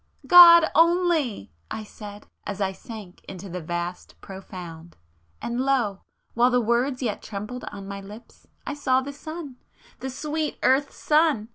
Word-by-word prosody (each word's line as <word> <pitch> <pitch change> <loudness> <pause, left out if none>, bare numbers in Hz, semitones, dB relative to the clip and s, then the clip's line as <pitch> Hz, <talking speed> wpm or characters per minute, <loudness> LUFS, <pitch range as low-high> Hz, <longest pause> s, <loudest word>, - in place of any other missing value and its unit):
"God 340 -2 +9
only!" 330 - +2 0.2
I 220 - -5
said, 205 -1 -11 0.2
as 200 -1 -5
I 195 -1 0
sank 200 -2 -11
into 190 +1 -9
the 180 +1 -5
vast 175 +2 -5
profound,—and 165 - -9
lo! 250 -8 0 0.3
while 240 +2 +4
the 250 0 +2
words 245 +3 0
yet 220 -4 -2
trembled 215 +4 -7
on 200 -1 -8
my 200 0 -6
lips, 210 +4 -14 0.2
I - - -3
saw 260 -3 +1
the 280 +2 -7
sun! 305 -2 -8 0.4
The 265 - -5
sweet 300 +3 -3
earth's 270 +2 +2
sun! 300 -8 +2
235 Hz, 145 wpm, -24 LUFS, 195-280 Hz, 0.4 s, God